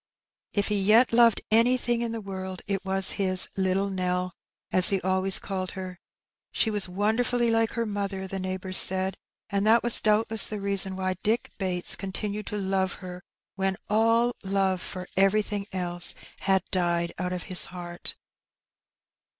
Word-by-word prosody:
If 205 0 0
he 205 -1 0
yet 225 +5 +4
loved 230 -2 +5
anything 240 +1 +2
in 235 -1 -2
the 225 -1 -5
world, 190 -2 -7
it 195 -2 -3
was 190 0 0
his 185 -1 +1
"little 195 +1 0
Nell,'^ 180 -1 -2 0.4
as 185 +1 +5
he 195 -2 +1
always 190 +1 +1
called 185 -2 -5
her. 185 -2 -7 0.5
She 220 - +1
was 205 -3 +1
wonderfully 230 +5 +1
like 225 0 +1
her 235 -1 -1
mother, 200 -2 -4
the 195 0 -5
neighbours 185 0 +2
said, 190 0 +6 0.4
and 200 +1 0
that 230 +2 +5
was 240 - +2
doubtless 215 0 +2
the 215 - -5
reason 195 -1 +1
why 185 -1 -2
Dick 225 +3 -1
Bates 180 -2 +2
continued 205 +2 -5
to 210 - -3
love 190 -1 0
her 180 -1 -9 0.3
when 195 0 -1
all 230 +2 +2
love 195 -2 0
for 185 -1 -6
everything 200 +1 +1
else 175 -2 -2 0.2
had 190 -2 +1
died 170 -2 0
out 180 -1 -2
of 180 -1 -4
his 185 -3 0
heart. 175 -1 -6
195 Hz, 160 wpm, -26 LUFS, 185-215 Hz, 0.5 s, said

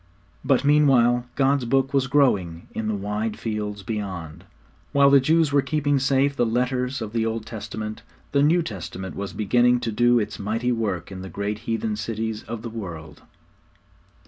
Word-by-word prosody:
But 135 0 +2
meanwhile 125 -5 +4
God's 135 -1 +2
Book 135 +3 +1
was 135 -1 +2
growing 100 - +1
in 110 - -4
the 110 - 0
wide 105 +2 -3
fields 105 -2 -4
beyond. 95 -7 -5 0.5
While 140 0 +5
the 140 - +8
Jews 155 +2 +2
were 140 - +5
keeping 145 -1 0
safe 135 +1 +2
the - - +2
letters 125 +2 0
of 110 0 -7
the 115 -1 +1
Old 115 -1 -2
Testament, 110 0 -6 0.3
the 140 - +3
New 165 +4 +4
Testament 95 - -6
was 100 +2 -4
beginning 120 +4 +3
to 115 - -2
do 120 +2 +3
its 105 -2 -2
mighty 115 +5 -1
work 100 -7 -2
in 95 -1 -7
the 95 - -7
great 100 +4 -3
heathen 115 -1 -1
cities 110 +1 -3
of 115 -1 -6
the 115 - -4
world. 80 -9 -8
115 Hz, 170 wpm, -24 LUFS, 105-135 Hz, 0.5 s, the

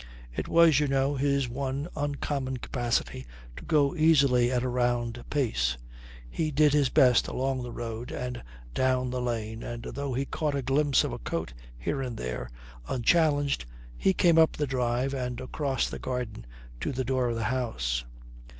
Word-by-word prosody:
It - - -3
was, 165 -4 +6
you 150 - +1
know, 135 +1 +1
his 140 -1 +1
one 135 +4 -3
uncommon 140 -2 -2
capacity 120 - -2 0.3
to - - -9
go 150 0 +2
easily 140 -7 +4
at 125 -1 +1
a - - 0
round 120 -1 0
pace. 65 - 0 0.5
He 155 - -2
did 150 0 +4
his 145 -3 +3
best 130 -5 +5
along 130 0 -1
the 125 -1 -6
road 115 +1 -5
and 125 -1 -4 0.3
down 130 -1 +1
the 125 0 -2
lane 115 -2 -3
and, 120 -1 -6
though 140 0 -4
he 135 +2 0
caught 150 0 -2
a 140 - -2
glimpse 140 +1 +3
of - - -3
a - - -5
coat - - -4 0.2
here 135 - -2
and 125 -4 -4
there, 60 0 -4 0.4
unchallenged 145 - +2 0.3
he 190 - +2
came 170 -3 +4
up 160 - +5
the 150 - -1
drive 125 0 0
and 125 -2 -3
across 135 +1 -1
the - - -6
garden 125 - -4 0.3
to - - -2
the 130 -1 -2
door 130 -1 +1
of 115 - -1
the 115 - -2
house. - - -1
130 Hz, 175 wpm, -28 LUFS, 120-140 Hz, 0.5 s, was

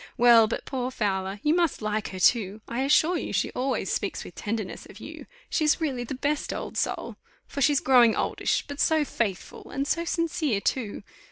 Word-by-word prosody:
Well, 235 -2 +7
but 230 - -4
poor 255 -2 -3
Fowler, 195 -4 -2
you 300 - +3
must 340 -3 +1
like 215 0 -2
her, 185 - -7
too 210 +1 +2
I 235 +2 -2
assure 310 +5 +3
you - - -5
she - - 0
always 260 +2 -1
speaks - - -2
with - - -11
tenderness 215 -2 -5
of - - -13
you; - - -10 0.2
she 315 - 0
is 300 +2 +3
really 270 -7 -2
the 245 - -5
best 285 +3 -1
old - - -5
soul! - - -2 0.3
for 280 - -6
she's 285 +1 +4
growing 245 -4 +5
oldish, - - 0
but 285 0 -7
so 315 -2 +3
faithful, 205 -8 -4
and 275 +1 -2
so 335 +3 0
sincere 335 - 0
too. 205 0 -2
255 Hz, 195 wpm, -26 LUFS, 215-295 Hz, 0.3 s, Well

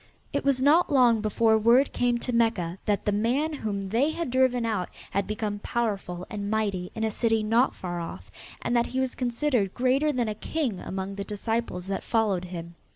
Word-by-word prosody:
It - - 0
was 275 -2 +2
not 310 +5 +4
long 245 -5 +5
before 220 +1 +3
word 240 +5 +4
came 245 -1 +1
to 250 - -3
Mecca 200 -7 +1
that 205 -1 0
the 205 - +2
man 245 +10 +1
whom 210 -8 -3
they 245 +8 +2
had 315 -4 -3
driven 255 -2 +2
out 210 -6 -1 0.2
had 200 0 0
become 210 -1 -3
powerful 200 -6 -2
and 205 -3 -4
mighty 200 -4 -1
in 220 - -3
a 220 - +1
city 225 0 +1
not 230 +4 +2
far 175 -1 -4
off 95 - -7 0.3
and 245 - 0
that 235 0 +3
he 260 - -3
was 260 -1 0
considered 240 -4 0
greater 260 +4 +2
than 245 -4 0
a 215 - -1
king 235 - -2
among 190 +1 -4
the 200 0 -4
disciples 210 -3 -3
that 195 0 -3
followed 210 -6 +1
him. 170 -1 -7
225 Hz, 200 wpm, -27 LUFS, 200-250 Hz, 0.3 s, long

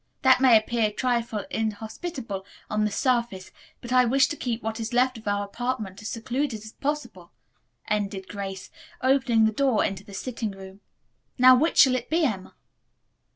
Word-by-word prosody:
That 260 -1 +5
may 250 -4 +7
appear 220 +1 +1
a - - -5
trifle 235 -3 -1
inhospitable 220 - -4 0.3
on 210 0 +1
the 210 - -1
surface, 235 -7 -1 0.3
but 240 +1 -5
I 255 0 +6
wish 265 +3 +4
to 300 - -3
keep 240 -5 -3
what 225 +1 -3
is 225 +1 -4
left 250 0 +2
of 220 - -13
our 205 0 0
apartment 220 -3 -4
as 210 - -6
secluded 240 0 -3
as 220 - -10
possible," 295 +4 -4 0.6
ended 200 -2 -2
Grace, 195 -2 -6 0.3
opening 255 -4 +3
the 220 - +2
door 260 0 +2
into 195 -1 -4
the 200 - -11
sitting 230 0 -4
room. 190 0 -12 0.6
"Now, 255 0 +8
which 315 +6 +1
shall 265 -3 +7
it 245 -1 -4
be, 325 0 +2
Emma?" 195 -8 -3
230 Hz, 175 wpm, -25 LUFS, 210-255 Hz, 0.6 s, Now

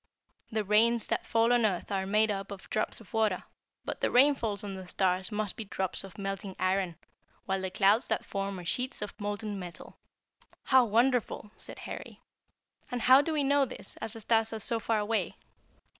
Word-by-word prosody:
The 215 -1 0
rains 220 +3 +3
that - - -2
fall 230 +1 +3
on 240 -1 +3
earth 200 -2 0
are 190 -1 -1
made 215 +2 +3
up 195 -1 -4
of 200 -1 -9
drops - - -1
of 225 - -17
water, 215 -4 +1 0.4
but - - -5
the - - +2
rainfalls 245 -6 +3
on 200 -1 -5
the 190 -1 -8
stars 185 +1 +1
must 210 -2 +1
be 225 - -5
drops 190 -1 0
of 195 -2 -11
melting 195 -1 -4
iron, 185 -2 0 0.5
while 190 0 -1
the 190 - -2
clouds 200 +5 +3
that - - -1
form 195 0 -3
are 175 - -9
sheets 250 +5 -1
of 210 - -6
molten 205 0 -3
metal." 175 -2 -9 0.6
"How 260 -2 +5
wonderful!" 235 -1 +1
said - - -9
Harry; - - -8 0.7
"and 245 - -3
how 260 +3 +7
do 320 - -3
we 300 -2 +1
know 280 0 +3
this, - - -9
as 220 - -5
the 225 - -3
stars 225 0 +2
are 220 - -4
so 230 +2 +1
far 225 0 0
away?" 210 -3 -1
210 Hz, 195 wpm, -30 LUFS, 195-230 Hz, 0.7 s, how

